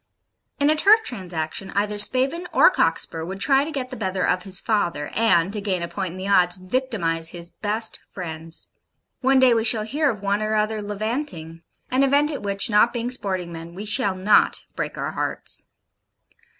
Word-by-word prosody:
In 285 +1 +4
a - - +2
turf 425 +7 +5
transaction, 180 - -2
either 205 +1 0
Spavin 265 +10 +3
or - - +6
Cockspur 160 -1 0
would 190 +4 -6
try 270 +5 +3
to 300 - -5
get 265 -3 -4
the - - -5
better 190 -4 -2
of 180 +1 0
his 190 -1 +1
father, 170 -9 -1
and, 200 -5 +2
to 210 - -2
gain 190 -4 -1
a - - -2
point 185 -1 -4
in - - -9
the 190 +1 -5
odds, 180 -2 +3
victimise 185 -6 -1
his 170 0 -9
best 220 +2 -3
friends. 165 -2 -5 0.5
One 265 0 +3
day 260 -2 +6
we 225 -1 +1
shall 225 -1 +3
hear 285 +7 0
of 210 -6 -4
one 200 +1 0
or 215 0 -1
other 215 0 0
levanting; 205 - -5 0.3
an 260 +1 +2
event 285 +2 +3
at 285 - -5
which, 200 +2 0
not 220 +1 +4
being 240 0 -3
sporting 185 -8 -4
men, 165 +1 -9
we 205 +3 -6
shall 205 -2 +1
not 190 +3 +3
break - - -4
our - - -3
hearts. - - -2
205 Hz, 190 wpm, -23 LUFS, 180-250 Hz, 0.5 s, or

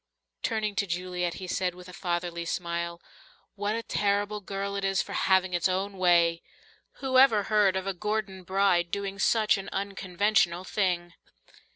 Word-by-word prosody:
Turning 215 -3 -1
to 200 - 0
Juliet, 180 -1 -2
he 190 - -7
said 180 0 -1
with 180 0 -12
a 180 - -11
fatherly 175 -1 -3
smile, 170 0 -3 0.5
"What 205 +1 -2
a 230 - -3
terrible 205 0 0
girl 200 +1 -4
it 200 - -3
is 195 -1 +1
for - - -2
having 190 -1 +2
its 175 +1 +2
own 195 +2 -2
way! 170 -2 +4 0.5
Who 260 -1 +2
ever 225 -6 +6
heard 205 -2 +3
of 190 0 -2
a 195 - -1
Gordon 210 0 -3
bride 185 -2 +2
doing 195 +1 -4
such 215 0 +3
an 195 - -7
unconventional 195 -2 0
thing? 180 -3 -1
190 Hz, 165 wpm, -28 LUFS, 175-205 Hz, 0.5 s, ever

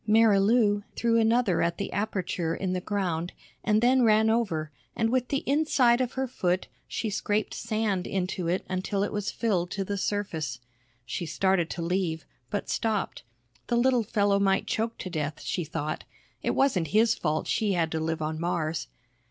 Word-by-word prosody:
Marilou 210 0 +4
threw 230 -1 +2
another 225 -5 +3
at 170 0 0
the - - -4
aperture 180 -5 -1
in 185 -1 -2
the 180 - -1
ground 180 -4 -2 0.3
and 215 0 +2
then 255 +1 +5
ran 220 -1 +5
over 165 -10 0 0.2
and 225 0 +1
with 255 -1 +1
the 275 +1 -1
inside 265 -4 +3
of 250 -1 -1
her 265 0 -1
foot 185 -7 -1 0.2
she 225 - -3
scraped 210 +1 -1
sand 215 -4 -1
into 185 -2 -2
it 180 +3 0
until 190 +2 -1
it 205 - -2
was 205 -1 -2
filled 190 -7 0
to 195 +1 -3
the 200 +1 -2
surface. 165 - -2 0.5
She 140 +8 -4
started 185 0 +1
to 170 - -4
leave, 170 -2 -1 0.2
but 205 - -3
stopped. 220 -3 -1 0.5
The 235 - +1
little 250 0 +4
fellow 205 -2 +2
might 195 -1 +2
choke 225 +1 -1
to 185 - -5
death, 155 -2 -3
she 180 - -2
thought, 155 0 -4 0.4
it - - 0
wasn't 205 -12 +2
his 220 +7 +4
fault 155 -5 -1
she 210 -3 +1
had 165 -3 0
to 160 - -1
live 160 0 -2
on 155 +1 -3
Mars. 165 -2 -1
200 Hz, 175 wpm, -27 LUFS, 170-225 Hz, 0.5 s, then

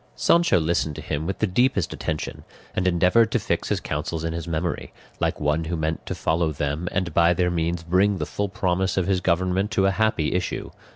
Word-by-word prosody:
Sancho 170 - +4
listened 80 -2 0
to - - -6
him 75 +3 -3
with 95 0 -2
the - - +1
deepest 110 -1 +1
attention, 75 - -4 0.3
and 95 - +1
endeavoured 90 +6 +4
to - - +2
fix - - -2
his - - +1
counsels 80 +2 -3
in 80 0 -2
his 85 0 -5
memory, 85 +1 -2 0.3
like - - 0
one 75 +2 0
who 85 +1 -2
meant 80 0 -2
to - - -3
follow 80 0 0
them 75 +4 -2
and 90 -5 -1
by 85 +2 +4
their 90 0 +1
means 85 0 -1
bring 95 +4 +2
the 75 - -2
full 100 +5 -3
promise 95 -2 0
of 95 - +2
his 95 -2 +1
government 95 +4 +1
to 100 -4 +1
a 95 - +4
happy 110 -6 +1
issue. 90 0 -2
90 Hz, 215 wpm, -24 LUFS, 80-95 Hz, 0.3 s, Sancho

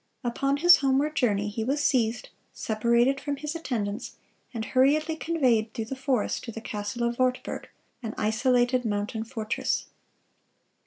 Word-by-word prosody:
Upon 275 +3 0
his 350 +4 +7
homeward 280 +2 +1
journey, 210 -6 +1
he 210 +2 -3
was 280 +5 0
seized, 235 -4 +1 0.2
separated 235 +5 +1
from 285 -1 -2
his 300 +2 -4
attendants, 230 -9 -4 0.4
and 225 -3 -4
hurriedly 295 +6 +2
conveyed 255 -10 +1
through 225 - -3
the 270 - -5
forest 260 -4 -1
to 230 - -5
the 225 - -7
castle 210 +1 -4
of 235 +1 -4
Wartburg, 255 0 -1 0.3
an 225 -3 -5
isolated 245 +3 +2
mountain 210 0 -2
fortress. 225 -2 -2
245 Hz, 145 wpm, -27 LUFS, 220-275 Hz, 0.4 s, his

